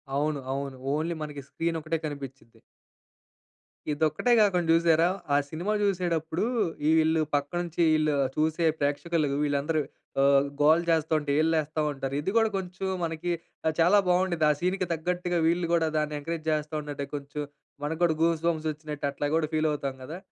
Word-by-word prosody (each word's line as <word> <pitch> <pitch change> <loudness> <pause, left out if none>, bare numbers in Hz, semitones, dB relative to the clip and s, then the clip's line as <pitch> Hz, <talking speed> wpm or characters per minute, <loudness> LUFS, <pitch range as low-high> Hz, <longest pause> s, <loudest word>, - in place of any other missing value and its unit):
అవును. 145 +1 0
అవును. 135 0 -3 0.2
ఓన్లీ 160 +3 -1
మనకి 145 -2 -6
స్క్రీన్ 165 0 -2
ఒకటే 160 +1 -1
కనిపించిది. 135 -5 -8 1.3
ఇదొక్కటే 155 +10 +1
కాకుండా 185 -5 +3
చూసారా? 165 0 +4 0.3
ఆ - - +5
సినిమా 175 +8 -2
చూసేటప్పుడు, 175 -2 0 0.4
ఈళ్ళు 160 0 +3
పక్కనుంచి, 170 +4 -2
ఈళ్ళు 155 -1 +2 0.2
చూసే 160 +2 +1
ప్రేక్షకులు 150 +2 0 0.2
వీళ్ళందరూ 150 +2 0 0.4
ఆహ్, 140 0 +5
గోల 155 +3 +5
చేస్తుంటే, 155 -2 +1
ఈలలు 160 +1 +2
వేస్తా 155 0 -1
ఉంటారు. 135 -1 -4
ఇది 160 +6 -2
కూడా 225 -1 +4
కొంచెం 190 0 -4 0.2
మనకి 165 +1 -2 0.3
ఆహ్, 160 - +2
చాలా 175 +5 +6
బాగుండేది. 180 -3 +2
ఆ - - +5
సీన్‌కి 185 +2 0
తగ్గట్టుగా 175 +2 -1
వీళ్ళు 170 +1 +1
కూడా 165 -1 +3
దాన్ని 150 0 -1
ఎంకరేజ్ 160 +1 -5
చేస్తా 150 0 -2
ఉంటంటే, 145 -1 -5
కొంచెం 145 +1 -5 0.4
మనకు 155 +2 -2
కూడా 165 -2 +3
గూస్‌బంప్స్ 165 -1 +1
వచ్చినట్టు 150 -1 -6
అట్లా 145 +1 -2
కూడా 160 -2 +1
ఫీల్ 155 0 +2
అవుతాం 140 -2 -3
కదా! 155 +6 -7
160 Hz, 150 wpm, -27 LUFS, 150-170 Hz, 1.3 s, చాలా